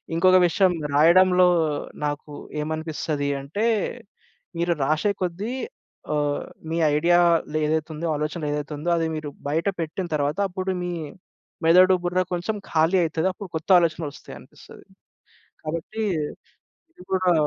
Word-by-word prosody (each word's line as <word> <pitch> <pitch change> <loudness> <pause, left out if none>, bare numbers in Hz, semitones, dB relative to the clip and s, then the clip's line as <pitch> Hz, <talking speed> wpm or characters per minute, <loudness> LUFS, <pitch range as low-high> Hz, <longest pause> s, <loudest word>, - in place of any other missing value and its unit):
ఇంకొక 185 +2 +5
విషయం 185 +1 +3 0.2
రాయడంలో 180 +4 +6 0.6
నాకు 145 0 -4 0.3
ఏమనిపిస్తది 155 -2 -3
అంటే. 160 +11 -2 0.9
మీరు 170 +1 +1
రాశె 155 +8 +1
కొద్దీ 190 +7 -2 0.6
ఆహ్, 145 -1 -1 0.2
మీ 165 - -1 0.2
ఐడియాలో 170 -1 +3
ఏదైతేతుందో, 155 +1 -2
ఆలోచన 150 +3 -3
ఏదైతేతుందో 150 +2 -3
అది 165 - 0
మీరు 155 -1 -5 0.2
బయట 160 +5 0
పెట్టిన 165 +3 -3
తరువాత, 145 +4 -1
అప్పుడు 185 +1 -3
మీ 175 0 -3 0.7
మెదడు 185 +3 +6
బుర్ర 180 +1 +1
కొంచెం 175 +5 -2 0.2
ఖాళీ 165 +3 +3
అయితది. 160 +2 0
అప్పుడు 195 -1 -9
కొత్త 160 - -11
ఆలోచనలొస్తయనిపిస్తది. 160 -3 -6 0.8
కాబట్టి 170 +8 -4 0.9
ఇది 180 - -16
గూడా 185 -1 +3
165 Hz, 115 wpm, -24 LUFS, 155-180 Hz, 0.9 s, రాయడంలో